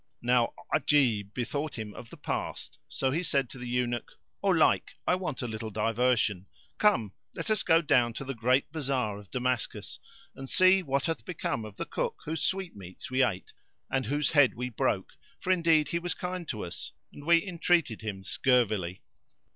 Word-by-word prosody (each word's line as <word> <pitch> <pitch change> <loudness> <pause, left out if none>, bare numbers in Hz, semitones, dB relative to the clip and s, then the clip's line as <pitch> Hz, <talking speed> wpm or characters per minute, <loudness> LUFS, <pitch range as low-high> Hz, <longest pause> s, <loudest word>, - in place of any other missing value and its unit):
Now 120 -1 +3 0.2
Ajib 115 -9 +3
bethought 145 +4 -3
him 110 -2 -5
of 115 - -10
the - - -12
past - - -4
so 135 -1 -1
he 160 +5 0
said 140 -7 0
to 130 - -9
the 125 - -6
Eunuch, 120 -1 -1 0.3
"O - - -1
Laik, - - +3
I - - +3
want 175 -9 -2
a - - -2
little 110 0 -5
diversion; 110 -3 +1 0.3
come, 115 - +3 0.2
let - - -3
us 215 - +2
go 165 +1 +4
down 120 -5 +3
to 135 - -6
the 135 - -3
great 125 +4 +2
bazar 130 -9 -1
of 100 - -14
Damascus, 125 -2 -2 0.4
[FN#463] - - -15
and 135 0 -7
see 185 +1 +6
what 140 -4 0
hath 165 - -2
become 155 -10 -3
of 105 -2 -10
the - - -3
cook - - -2
whose 160 +2 -3
sweetmeats 130 - -3
we 130 +1 +2
ate 95 -7 -2 0.4
and 130 -4 0
whose 145 +3 +1
head 145 -5 +5
we 125 +1 -3
broke, 115 - -1 0.3
for 185 - 0
indeed 165 -4 +4
he 170 - 0
was 175 0 -2
kind 180 -1 -4
to 110 -6 -3
us 85 - -7 0.2
and 145 - -11
we 170 +3 +4
entreated 170 - +1
him 100 -3 -5
scurvily." 105 -7 +1
130 Hz, 185 wpm, -29 LUFS, 110-160 Hz, 0.4 s, see